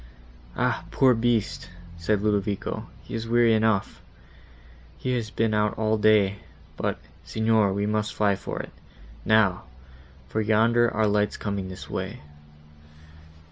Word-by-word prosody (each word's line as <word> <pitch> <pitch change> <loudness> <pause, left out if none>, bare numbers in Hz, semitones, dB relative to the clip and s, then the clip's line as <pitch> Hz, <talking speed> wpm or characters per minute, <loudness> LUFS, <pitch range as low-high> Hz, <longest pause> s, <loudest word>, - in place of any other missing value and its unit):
"Ah! - - 0
poor 130 -2 +4
beast," 115 -2 0 0.3
said 100 +5 -1
Ludovico, 105 -1 -1 0.2
"he - - -11
is 115 0 -3
weary 120 0 +4
enough;—he 110 - -4
has 115 -3 -2
been 110 +1 0
out 105 0 +1
all 110 0 +1
day; 105 -2 +3 0.4
but, - - -2 0.3
Signor, 110 -2 +2
we 100 +1 -1
must 105 0 -1
fly 100 -2 +2
for - - -6
it, - - -7 0.5
now; 110 -4 +3 0.6
for 110 +11 -1
yonder 115 +2 +3
are 110 +1 +1
lights 105 0 +1
coming 100 -2 -3
this 95 - -9
way." - - -5
110 Hz, 130 wpm, -25 LUFS, 100-110 Hz, 0.6 s, poor